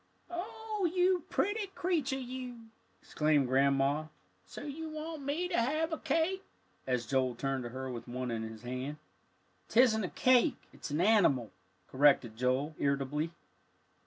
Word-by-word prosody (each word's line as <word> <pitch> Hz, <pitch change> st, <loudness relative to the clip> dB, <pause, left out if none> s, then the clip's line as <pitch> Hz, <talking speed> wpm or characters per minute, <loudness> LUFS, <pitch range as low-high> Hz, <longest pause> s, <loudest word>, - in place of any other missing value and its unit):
"Oh, 405 Hz, +2 st, -2 dB
you 360 Hz, -1 st, +2 dB
pretty 410 Hz, +4 st, 0 dB
creature 310 Hz, -7 st, 0 dB
you!" 250 Hz, -3 st, -7 dB, 0.3 s
exclaimed 150 Hz, -2 st, +2 dB
Grandma. 140 Hz, +3 st, +2 dB, 0.4 s
"So -, -, -9 dB
you 310 Hz, +2 st, -5 dB
want 310 Hz, 0 st, -6 dB
me 295 Hz, +6 st, -1 dB
to 340 Hz, -, +2 dB
have 310 Hz, +6 st, 0 dB
a 320 Hz, -, -3 dB
cake?" 375 Hz, +4 st, 0 dB, 0.4 s
as 125 Hz, -2 st, 0 dB
Joel 130 Hz, 0 st, +1 dB
turned 135 Hz, 0 st, -2 dB
to -, -, -4 dB
her 130 Hz, +2 st, -5 dB
with 120 Hz, 0 st, -7 dB
one 125 Hz, 0 st, -3 dB
in 115 Hz, -1 st, -2 dB
his 110 Hz, 0 st, -7 dB
hand. 130 Hz, +4 st, -4 dB, 0.7 s
"Tisn't 225 Hz, -3 st, +4 dB
a 180 Hz, -, -2 dB
cake 255 Hz, +3 st, +4 dB, 0.2 s
it's -, -, -7 dB
an 150 Hz, +3 st, 0 dB
animal," 180 Hz, -, +4 dB, 0.4 s
corrected 135 Hz, -5 st, +4 dB
Joel, 130 Hz, +5 st, 0 dB
irritably. 140 Hz, +3 st, 0 dB
170 Hz, 145 wpm, -32 LUFS, -, 0.7 s, Tisn't